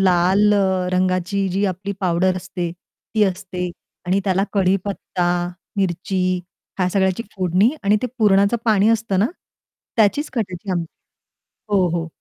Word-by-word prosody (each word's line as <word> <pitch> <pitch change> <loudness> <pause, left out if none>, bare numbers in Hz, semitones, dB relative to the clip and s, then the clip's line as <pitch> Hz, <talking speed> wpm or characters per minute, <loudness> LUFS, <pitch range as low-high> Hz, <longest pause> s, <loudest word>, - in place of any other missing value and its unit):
लाल 190 +3 +4
अ, 190 -2 +1
रंगाची 185 +1 +1
जी 195 +3 0
आपली 195 +3 -5
पावडर 185 0 +2
असते, 180 -2 -4
ती 210 +4 -3
असते 180 -2 -3 0.4
आणि 190 +2 +2
त्याला 190 0 +2
कढीपत्ता, 190 -2 0 0.5
मिरची 190 0 -1 0.6
ह्या 180 -1 +2
सगळ्याची 190 +2 +1
फोडणी 185 +4 +3
आणि 205 +1 +4
ते 250 - +1
पुरणाचं 200 +1 +4
पाणी 215 -2 +4
असतं 220 -4 +1
ना, 205 - +4 0.7
त्याचीच 230 +7 +2
कटाची 195 -6 -3
आमटी 170 -3 -2 0.8
हो, 190 -2 +4
हो. 165 0 -2
190 Hz, 135 wpm, -21 LUFS, 180-200 Hz, 0.8 s, लाल